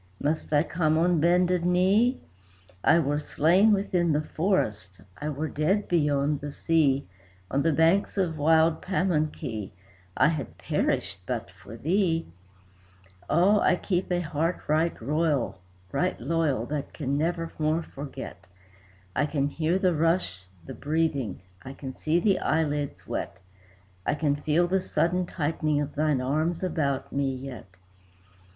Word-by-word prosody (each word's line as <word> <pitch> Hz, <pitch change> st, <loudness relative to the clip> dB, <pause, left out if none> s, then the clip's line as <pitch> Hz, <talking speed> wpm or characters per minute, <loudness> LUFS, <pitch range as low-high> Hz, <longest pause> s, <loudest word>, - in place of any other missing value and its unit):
must 155 Hz, +2 st, -2 dB
I 150 Hz, 0 st, +4 dB
come 160 Hz, -2 st, +1 dB
on 170 Hz, 0 st, +3 dB
bended 175 Hz, +2 st, +3 dB
knee? 190 Hz, +8 st, +3 dB, 0.6 s
I -, -, +5 dB
were 145 Hz, -2 st, +1 dB
slain 175 Hz, +8 st, +3 dB
within 180 Hz, -5 st, +1 dB
the 150 Hz, +1 st, +1 dB
forest, 105 Hz, -, -1 dB, 0.2 s
I 150 Hz, -, -3 dB
were 150 Hz, +2 st, -3 dB
dead 160 Hz, +9 st, 0 dB
beyond 145 Hz, -3 st, +1 dB
the 145 Hz, 0 st, -5 dB
sea; 140 Hz, -3 st, +2 dB, 0.5 s
On 140 Hz, -, +1 dB
the 165 Hz, -, +2 dB
banks 165 Hz, +7 st, +2 dB
of 175 Hz, -5 st, 0 dB
wild 160 Hz, +1 st, +4 dB
Pamunkey, 155 Hz, -, -1 dB, 0.4 s
I 150 Hz, -, +5 dB
had 150 Hz, -7 st, -4 dB
perished 95 Hz, -, -1 dB
but 115 Hz, -5 st, -3 dB
for 95 Hz, +5 st, -12 dB
thee. 165 Hz, -, +1 dB, 1.0 s
"Ah, 185 Hz, +7 st, +4 dB
I 185 Hz, -, +3 dB
keep 180 Hz, 0 st, -2 dB
a 175 Hz, 0 st, +1 dB
heart 165 Hz, +2 st, -1 dB
right 160 Hz, +3 st, +1 dB
loyal, 150 Hz, +1 st, 0 dB, 0.4 s
that 150 Hz, -, -1 dB
can 135 Hz, +2 st, -2 dB
never 165 Hz, +2 st, -1 dB
more 155 Hz, +2 st, +1 dB
forget! 135 Hz, -, -9 dB, 0.7 s
I 145 Hz, -, +2 dB
can 140 Hz, -1 st, 0 dB
hear 160 Hz, +4 st, 0 dB
the 185 Hz, -2 st, +2 dB
rush, 160 Hz, -, 0 dB, 0.2 s
the -, -, -7 dB
breathing; 145 Hz, -, -1 dB, 0.2 s
I 135 Hz, -, -8 dB
can 130 Hz, -2 st, -8 dB
see 160 Hz, +2 st, +1 dB
the 195 Hz, +1 st, +2 dB
eyelids 150 Hz, -2 st, -1 dB
wet; -, -, -4 dB, 0.7 s
I -, -, 0 dB
can 150 Hz, -2 st, +1 dB
feel 155 Hz, +4 st, +1 dB
the 190 Hz, +1 st, +1 dB
sudden 180 Hz, 0 st, 0 dB
tightening 155 Hz, -2 st, -1 dB
of 145 Hz, 0 st, -3 dB
thine 150 Hz, -3 st, +1 dB
arms 155 Hz, +7 st, -1 dB
about 140 Hz, -7 st, -1 dB
me 140 Hz, -1 st, 0 dB
yet. 130 Hz, -5 st, -8 dB
155 Hz, 140 wpm, -27 LUFS, 140-175 Hz, 1.0 s, I